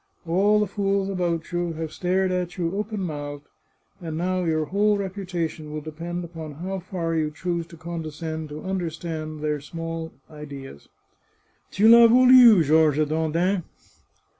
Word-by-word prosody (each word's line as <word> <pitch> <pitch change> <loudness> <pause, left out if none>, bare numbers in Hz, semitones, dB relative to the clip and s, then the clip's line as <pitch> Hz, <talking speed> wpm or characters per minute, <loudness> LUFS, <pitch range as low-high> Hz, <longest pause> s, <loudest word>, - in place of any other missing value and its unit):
All 200 +5 +3
the 210 - +2
fools 195 0 -1
about 175 -4 -2
you 175 -1 -1
have 160 -1 -5
stared 185 +1 0
at 180 0 -2
you 175 +1 -2
open 210 0 -3
mouthed, 145 -4 -5 0.6
and 160 -2 -5
now 185 +2 -1
your 155 -1 0
whole 205 +5 +2
repu 195 -1 -5
tation 165 -3 -3
will 155 - -4
depend 170 +3 -5
upon 160 -3 -8
how 185 +6 -5
far 175 -2 -3
you 155 -2 0
choose 170 +2 -3
to 170 -1 -13
condescend 160 -1 -5
to 150 +1 -8
understand 165 -4 -4
their 150 -1 -1
small 165 +1 -6 0.2
ideas 140 - -10 0.3
— - - -42
* - - -41
Tu 205 - +1
I'as 235 -1 +8
voulu, 250 -5 +8
Georges 155 0 +3
Dandin! 165 +5 0
170 Hz, 160 wpm, -24 LUFS, 155-190 Hz, 0.6 s, I'as